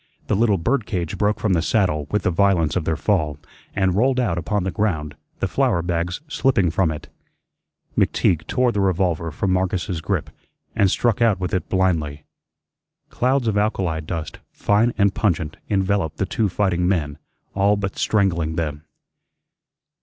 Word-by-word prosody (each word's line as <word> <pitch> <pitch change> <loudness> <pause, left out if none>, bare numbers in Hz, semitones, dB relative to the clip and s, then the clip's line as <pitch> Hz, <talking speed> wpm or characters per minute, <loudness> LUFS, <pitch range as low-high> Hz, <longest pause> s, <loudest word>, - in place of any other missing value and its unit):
The - - 0
little 105 -1 +3
bird 115 +7 0
cage 85 -5 -2
broke 105 0 0
from 105 -4 +1
the 85 - +2
saddle 85 -7 +1
with 105 -2 0
the 90 - +2
violence 85 -4 +2
of 90 -4 -1
their 80 - +1
fall, 80 -7 0 0.4
and 95 -2 +2
rolled 130 +6 +2
out 110 -9 +1
upon 100 +3 -1
the 95 - -2
ground, 80 -7 -1 0.3
the - - +1
flour 85 -1 +1
bags 85 +3 -2
slipping 125 - +2
from 90 -1 +2
it. 75 -1 -6 0.9
McTeague 80 -3 +1
tore 125 -1 +2
the 105 - -1
revolver 90 -3 0
from 95 +4 -1
Marcus's 90 -2 -1
grip - - -2 0.4
and 100 - +3
struck 120 +3 +1
out 110 -5 +3
with 90 -1 -3
it 95 - -1
blindly. 80 -6 0 0.9
Clouds 130 0 +1
of 105 -2 +2
alkali 95 -6 0
dust, 80 0 -5
fine 105 +4 +2
and 100 -1 +3
pungent, 85 -7 -1
enveloped 95 -5 0
the 95 - 0
two 105 +2 0
fighting 90 -2 0
men, 75 -6 -1 0.3
all 100 +1 +3
but 100 -1 -3
strangling 85 -7 +1
them. 75 -3 -3
95 Hz, 165 wpm, -22 LUFS, 85-105 Hz, 0.9 s, little